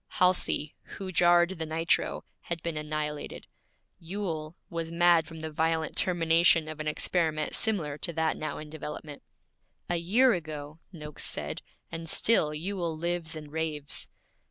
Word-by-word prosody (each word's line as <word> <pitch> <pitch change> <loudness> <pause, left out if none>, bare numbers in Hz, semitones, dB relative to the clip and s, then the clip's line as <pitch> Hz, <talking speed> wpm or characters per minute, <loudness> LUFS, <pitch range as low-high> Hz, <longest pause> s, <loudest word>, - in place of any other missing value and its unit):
Halsey, 180 -5 +2 0.2
who 190 -1 -5
jarred 175 +1 +4
the 160 - -1
nitro, 165 +2 +1
had 170 -1 -5
been 170 -2 -2
annihilated. 150 -1 -4 0.5
Ewell 165 -3 -4
was 165 -1 -4
mad 170 -1 +5
from 160 -1 -9
the 160 0 -4
violent 160 +1 0
termination 165 -3 +4
of 155 0 -7
an 155 - -3
experiment 155 0 0
similar 160 -10 +1
to 170 - -2
that 160 0 +1
now 155 -2 -4
in 150 0 -8
development. 150 -1 -7 0.7
'A 175 - +2
year 225 +10 +4
ago!' 155 -2 -5
Noakes 150 -4 -5
said, - - -2 0.3
'and 165 0 -4
still 210 -9 +4
Ewell 170 +1 -2
lives 170 0 -2
and 150 -2 -8
raves!' 155 -2 -2
160 Hz, 145 wpm, -29 LUFS, 155-175 Hz, 0.7 s, mad